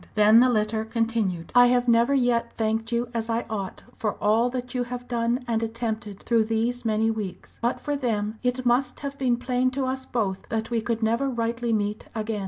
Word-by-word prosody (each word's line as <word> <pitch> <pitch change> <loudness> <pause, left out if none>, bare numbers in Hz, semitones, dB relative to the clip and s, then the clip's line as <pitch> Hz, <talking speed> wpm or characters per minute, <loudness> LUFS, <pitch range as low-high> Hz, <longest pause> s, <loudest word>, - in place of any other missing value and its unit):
Then 215 +2 +7
the 255 +1 +5
letter 220 -1 +1
continued: 220 -6 -1
"I 245 0 +7
have 245 0 +2
never 235 +4 +4
yet 245 -3 +1
thanked 225 +1 -1
you 235 0 0
as 230 0 -2
I 230 +1 0
ought 195 -3 -4
for 210 -2 -2
all 220 +4 +2
that 250 0 -5
you 250 -1 -1
have 245 0 -6
done 240 +1 -1
and 225 -1 0
attempted 225 -3 -4
through 230 -2 +2
these 230 +2 -1
many 220 0 +1
weeks. 195 -5 -6
But 240 +1 0
for 290 - -2
them 220 -5 -2
it 250 0 -1
must 250 +1 +1
have 280 -1 -4
been 250 -3 +2
plain 250 +1 +1
to 270 - +1
us 260 0 -3
both 200 -6 -2
that 225 +1 -2
we 230 -1 +1
could 225 +1 -2
never 235 +5 +1
rightly 235 -1 -1
meet 210 -1 -1
again. 220 -1 -2
230 Hz, 205 wpm, -25 LUFS, 220-245 Hz, -, Then